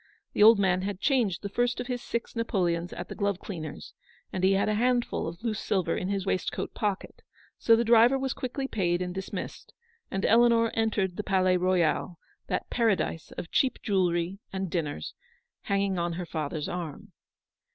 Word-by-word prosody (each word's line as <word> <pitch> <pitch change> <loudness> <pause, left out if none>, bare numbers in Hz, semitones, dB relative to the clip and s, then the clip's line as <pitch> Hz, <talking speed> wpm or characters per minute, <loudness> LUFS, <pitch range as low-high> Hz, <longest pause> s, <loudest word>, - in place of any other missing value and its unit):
The - - 0
old 220 +1 +9
man 185 -2 +2
had 195 -1 -3
changed 225 -11 +1
the 200 - -3
first 245 +4 0
of 245 - -3
his 245 -1 -3
six 235 +1 -4
napoleons 175 -7 0
at 175 - -6
the - - -6
glove 200 -3 0
cleaner's, 165 -6 -7 0.4
and 185 - -2
he 190 +1 +5
had 195 - +2
a 215 - +1
handful 240 -1 +1
of 170 +5 -8
loose 220 -3 -1
silver 180 -4 0
in 185 - -2
his 200 -1 -1
waistcoat 190 -1 -2
pocket, 205 -2 -3 0.4
so 230 - +5
the 230 - +2
driver 235 +3 +6
was 265 -1 -2
quickly 270 +2 -4
paid 175 -7 0
and 180 0 -4
dis 190 +1 -6
missed, - - -6 0.4
and 195 - -2
Eleanor 230 0 +5
entered 210 -5 0
the 210 - -2
Palais 185 -2 +2
Royal, 180 -1 +1 0.3
that - - -2
paradise 215 -8 0
of 165 - -7
cheap 265 - +2
jewellery 180 -2 0
and 190 -2 -3
dinners, 150 - -3 0.5
hanging 200 -2 0
on 170 0 -1
her 175 +1 -4
father's 155 -2 -3
arm. 170 -5 -6
195 Hz, 185 wpm, -28 LUFS, 175-230 Hz, 0.5 s, old